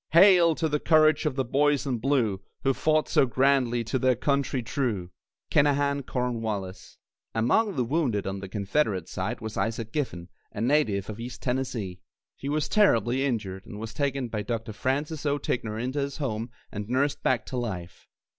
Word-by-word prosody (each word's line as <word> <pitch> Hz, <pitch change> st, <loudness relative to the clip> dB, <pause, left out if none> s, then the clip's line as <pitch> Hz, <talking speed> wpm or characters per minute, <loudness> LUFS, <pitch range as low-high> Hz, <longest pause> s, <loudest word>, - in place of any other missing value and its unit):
Hail! 175 Hz, -2 st, +7 dB
to 160 Hz, -, 0 dB
the 150 Hz, -1 st, 0 dB
courage 155 Hz, -1 st, +4 dB
of 140 Hz, -, -2 dB
the 135 Hz, -1 st, 0 dB
Boys 145 Hz, +3 st, +2 dB
in 125 Hz, -4 st, -1 dB
Blue, 115 Hz, -7 st, +1 dB, 0.2 s
Who 135 Hz, -, +3 dB
fought 155 Hz, +2 st, +2 dB
so 135 Hz, -, +3 dB
grandly, 130 Hz, -2 st, +2 dB
to 130 Hz, +3 st, -1 dB
their 130 Hz, -1 st, +3 dB
Country 140 Hz, -1 st, 0 dB
true. 110 Hz, -8 st, -2 dB, 0.4 s
KINAHAN 140 Hz, -1 st, +2 dB
CORNWALLIS. 110 Hz, -7 st, -3 dB, 0.4 s
Among 175 Hz, -, +2 dB
the 125 Hz, -, +1 dB
wounded, 120 Hz, -, 0 dB
on 95 Hz, 0 st, -3 dB
the 95 Hz, 0 st, -7 dB
Confederate 100 Hz, -, 0 dB
side, 115 Hz, +6 st, -4 dB
was 110 Hz, -1 st, -5 dB
Isaac 115 Hz, 0 st, -2 dB
Giffen, 90 Hz, -, -3 dB, 0.2 s
a 110 Hz, -, -7 dB
native 115 Hz, -6 st, +2 dB
of 110 Hz, 0 st, -7 dB
East 120 Hz, 0 st, -7 dB
Tennessee. 125 Hz, -8 st, -2 dB, 0.4 s
He 140 Hz, -, -5 dB
was 150 Hz, +1 st, 0 dB
terribly 130 Hz, -, +3 dB
injured, 105 Hz, -8 st, -3 dB
and 105 Hz, -3 st, -8 dB
was 110 Hz, 0 st, -6 dB
taken 140 Hz, -3 st, -1 dB
by 110 Hz, -2 st, -3 dB
Dr. 110 Hz, +1 st, -4 dB
Francis 140 Hz, +7 st, -2 dB
O. 145 Hz, 0 st, +2 dB
Ticknor 115 Hz, -6 st, -2 dB
into 130 Hz, +5 st, -2 dB
his 140 Hz, 0 st, -2 dB
home 115 Hz, -5 st, -3 dB, 0.2 s
and 105 Hz, +1 st, -5 dB
nursed 140 Hz, +3 st, +1 dB
back 120 Hz, -4 st, +1 dB
to 130 Hz, -, -5 dB
life. 90 Hz, -8 st, -5 dB
125 Hz, 175 wpm, -27 LUFS, 110-140 Hz, 0.4 s, Hail